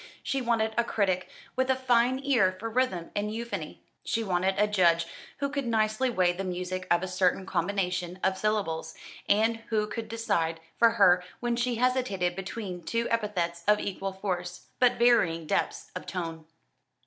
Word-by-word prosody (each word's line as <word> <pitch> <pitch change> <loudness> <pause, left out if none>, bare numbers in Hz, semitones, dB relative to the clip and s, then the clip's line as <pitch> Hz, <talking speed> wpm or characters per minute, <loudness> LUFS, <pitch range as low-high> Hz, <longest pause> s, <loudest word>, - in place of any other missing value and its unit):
She 270 - -1
wanted 225 -2 +1
a - - +4
critic 190 -5 0 0.3
with 260 +1 +1
a 260 - +4
fine 255 0 +2
ear 225 -10 +3
for 225 +2 -4
rhythm 220 -9 0
and 210 +1 -1
euphony. 235 +2 -5 0.2
She 225 - -1
wanted 190 -1 +1
a 210 - +4
judge 175 -5 +3 0.3
who 280 - -1
could 280 -2 -3
nicely 220 +2 +1
weigh 185 -6 +2
the 190 +2 -4
music 185 0 -4
of 175 +1 +3
a - - -2
certain 185 +1 +1
combination 180 -1 -1
of 190 0 +2
syllables, 200 -5 -1 0.3
and 220 +3 +3
who 215 -2 +1
could 220 +1 -5
decide 200 -8 -1 0.2
for 230 - +6
her 180 -5 +5 0.2
when 240 -1 0
she 240 0 0
hesitated 230 -8 +1
between 190 -1 -5
two 230 +7 -1
epithets 180 -7 -1
of 210 0 +5
equal 195 0 -3
force, 180 -2 -4
but 250 -1 +5
varying 175 -9 +3
depths - - -1
of 180 - -6
tone. 165 -3 -4
205 Hz, 170 wpm, -28 LUFS, 180-230 Hz, 0.3 s, for